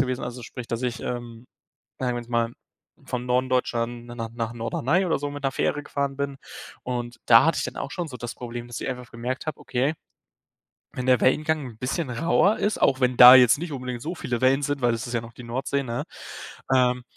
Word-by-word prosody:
gewesen, 130 Hz, -2 st, -1 dB
also 125 Hz, 0 st, -6 dB
sprich, 120 Hz, +1 st, -8 dB
dass 115 Hz, +2 st, -3 dB
ich, 125 Hz, -1 st, -2 dB
ähm, 120 Hz, -1 st, -6 dB, 0.5 s
sagen 125 Hz, -2 st, 0 dB
wir -, -, -2 dB
jetzt 120 Hz, -, -17 dB
mal 115 Hz, -1 st, +1 dB, 0.6 s
von 125 Hz, -1 st, -3 dB
Norden 125 Hz, +1 st, +1 dB
Deutschland 120 Hz, -1 st, -1 dB
na 120 Hz, -, -9 dB
nach 115 Hz, -1 st, -4 dB
nach 115 Hz, -1 st, -3 dB
Norderney 130 Hz, +10 st, 0 dB
oder 165 Hz, -, +1 dB
so 145 Hz, 0 st, -3 dB
mit 145 Hz, -1 st, -8 dB
'ner 135 Hz, -, +1 dB
Fähre 145 Hz, +3 st, 0 dB
gefahren 140 Hz, -1 st, -2 dB
bin, 140 Hz, -1 st, -3 dB, 0.4 s
und 120 Hz, -1 st, -4 dB
da 115 Hz, -1 st, +8 dB
hatte 165 Hz, 0 st, +2 dB
ich -, -, -1 dB
dann -, -, -5 dB
auch 140 Hz, -, -4 dB
schon 175 Hz, -4 st, -3 dB
so 130 Hz, -, -7 dB
das 120 Hz, 0 st, -6 dB
Problem, 120 Hz, -1 st, -7 dB
dass 120 Hz, -, -6 dB
ich -, -, -3 dB
einfach 125 Hz, -2 st, -6 dB
gemerkt 125 Hz, +4 st, -4 dB
habe: 155 Hz, -, -4 dB
Okay, 135 Hz, +5 st, 0 dB, 1.0 s
wenn 125 Hz, -, -4 dB
der 130 Hz, -2 st, +4 dB
Wellengang 155 Hz, +2 st, +2 dB
'n 115 Hz, -3 st, -12 dB
bisschen 135 Hz, +5 st, -2 dB
rauer 170 Hz, -, +2 dB
ist, 210 Hz, 0 st, 0 dB
auch 130 Hz, 0 st, +3 dB
wenn 125 Hz, -1 st, +2 dB
da 125 Hz, +1 st, +12 dB
jetzt 125 Hz, -1 st, +7 dB
nicht 165 Hz, 0 st, -5 dB
unbedingt 125 Hz, -2 st, -5 dB
so 170 Hz, +6 st, -4 dB
viele 120 Hz, -6 st, -3 dB
Wellen 135 Hz, +2 st, +4 dB
sind, 145 Hz, -1 st, -2 dB
weil 120 Hz, -1 st, +3 dB
das 115 Hz, +3 st, -3 dB
ist -, -, -6 dB
ja 120 Hz, -, +1 dB
noch 115 Hz, 0 st, -11 dB
die 125 Hz, -, -11 dB
Nordsee, 130 Hz, +4 st, -2 dB
ne, 120 Hz, -1 st, -3 dB, 0.7 s
ähm, 125 Hz, -1 st, +3 dB
125 Hz, 230 wpm, -25 LUFS, 120-140 Hz, 1.0 s, da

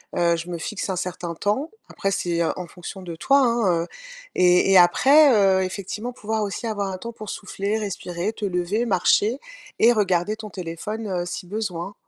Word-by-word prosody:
heu, 170 Hz, -1 st, +2 dB
je 170 Hz, +2 st, -6 dB
me 175 Hz, -, -3 dB
fixe 205 Hz, +4 st, -4 dB
un 190 Hz, -, -1 dB
certain 175 Hz, -1 st, -4 dB
temps», 210 Hz, -, -1 dB, 0.2 s
après 195 Hz, -, -2 dB
c'est, 170 Hz, -3 st, -1 dB
heu, -, -, +1 dB
en 180 Hz, -1 st, -6 dB
fonction 180 Hz, +3 st, -9 dB
de 170 Hz, -3 st, -7 dB
toi 275 Hz, +10 st, +4 dB
hein, 230 Hz, -10 st, +2 dB
heu, 170 Hz, -, -8 dB, 0.5 s
et 180 Hz, +1 st, +4 dB
et 195 Hz, -, +7 dB
après, 270 Hz, -, +6 dB
heu, 195 Hz, -3 st, +4 dB
effectivement 210 Hz, +5 st, -5 dB
pouvoir 220 Hz, -2 st, -2 dB
aussi 205 Hz, +4 st, -4 dB
avoir 205 Hz, -3 st, -2 dB
un 190 Hz, -, -4 dB
temps 230 Hz, +5 st, -7 dB
pour 215 Hz, -2 st, -9 dB
souffler, 200 Hz, +2 st, -3 dB
respirer, 190 Hz, -1 st, -3 dB
te 215 Hz, -, -4 dB
lever, 185 Hz, +5 st, -1 dB
marcher, 210 Hz, +4 st, +2 dB, 0.4 s
et 230 Hz, -, +6 dB
regarder 205 Hz, 0 st, +1 dB
ton 215 Hz, -1 st, -8 dB
téléphone, 190 Hz, +5 st, -5 dB
heu, 180 Hz, -3 st, -2 dB
si 180 Hz, +1 st, -6 dB
besoin. 195 Hz, -2 st, -4 dB
195 Hz, 195 wpm, -23 LUFS, 175-215 Hz, 0.5 s, et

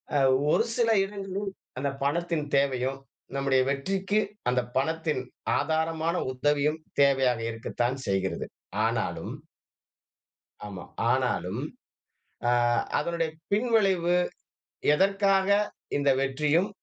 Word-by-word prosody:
அ -, -, +5 dB, 0.3 s
ஒரு -, -, +4 dB
சில 235 Hz, -2 st, +2 dB, 0.2 s
இடங்களில் 195 Hz, 0 st, -4 dB, 0.3 s
அந்த 140 Hz, +1 st, 0 dB
பணத்தின் 165 Hz, +1 st, 0 dB
தேவையும் 135 Hz, -1 st, 0 dB, 0.4 s
நம்முடைய 135 Hz, -1 st, +3 dB
வெற்றிக்கு 190 Hz, +9 st, 0 dB, 0.3 s
அந்த 125 Hz, 0 st, +2 dB, 0.2 s
பணத்தின் 155 Hz, -1 st, 0 dB, 0.4 s
ஆதாரமான 160 Hz, +2 st, 0 dB, 0.2 s
உதவியும் 145 Hz, +3 st, +1 dB, 0.2 s
தேவையாக 135 Hz, -4 st, +3 dB
இருக்கத்தான் 120 Hz, +3 st, -2 dB
செய்கிறது. 95 Hz, -3 st, -1 dB, 0.4 s
ஆனாலும் -, -, -2 dB, 1.3 s
ஆமா. 95 Hz, -3 st, -7 dB, 0.3 s
ஆனாலும் -, -, 0 dB, 0.9 s
ஆ, -, -, +4 dB, 0.5 s
அதனுடைய 165 Hz, +2 st, -1 dB, 0.2 s
பின்விளைவு 200 Hz, -6 st, +3 dB, 0.8 s
எதற்காக 195 Hz, +2 st, +3 dB, 0.5 s
இந்த 140 Hz, -1 st, +3 dB
வெற்றியும் 150 Hz, +7 st, +2 dB
150 Hz, 90 wpm, -27 LUFS, 135-190 Hz, 1.3 s, அ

